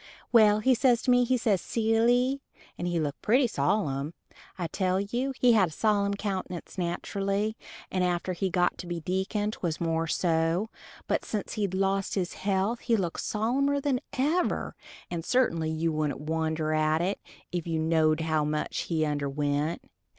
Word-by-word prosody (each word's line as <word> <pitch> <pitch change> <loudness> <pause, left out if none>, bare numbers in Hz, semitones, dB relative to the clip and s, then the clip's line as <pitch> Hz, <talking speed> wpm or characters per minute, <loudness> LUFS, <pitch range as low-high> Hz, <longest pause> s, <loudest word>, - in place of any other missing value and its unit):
Well, 215 -3 +6
he 260 +4 +4
says 245 -1 +3
to 255 - +3
me, 245 0 +4
says 215 -7 +1
he, 225 -1 +1
"Silly," 245 +4 +3 0.3
and 175 - -3
he 175 -1 0
looked 145 -3 -3
pretty 250 +5 +4
sollem, 145 - 0 0.4
I 180 - -2
tell 185 +2 0
you 240 +7 -1
he 245 -1 +5
had 195 -6 +4
a - - -13
sollem 200 +2 +1
countenance 190 -4 -4
naterally 195 +4 -1 0.4
and 185 -1 +1
after 180 +1 0
he 190 +2 -1
got 180 0 +1
to 180 - -7
be 175 -1 -3
deacon 190 +5 -1
'twas 170 -7 -3
more 165 -1 0
so, 165 +5 +1 0.3
but - - 0
since 210 -2 -4
he'd 200 -3 -1
lost 195 0 0
his 185 -3 -1
health 200 +4 0
he 230 - +1
looked 180 -6 -2
sollemer 270 +7 +1
than 275 -3 0 0.2
ever, 310 +7 0 0.4
and 170 -2 -3
certainly 170 -10 +1
you 160 +1 0
wouldent 150 -2 -1
wonder 160 0 -1
at 155 +1 +2
it 195 +3 -1 0.3
if 175 -2 -3
you 165 -1 -1
knowed 160 0 +2
how 160 -1 +1
much 150 0 -2
he 160 -2 +1
underwent. 145 +2 -1
185 Hz, 170 wpm, -28 LUFS, 160-220 Hz, 0.4 s, Well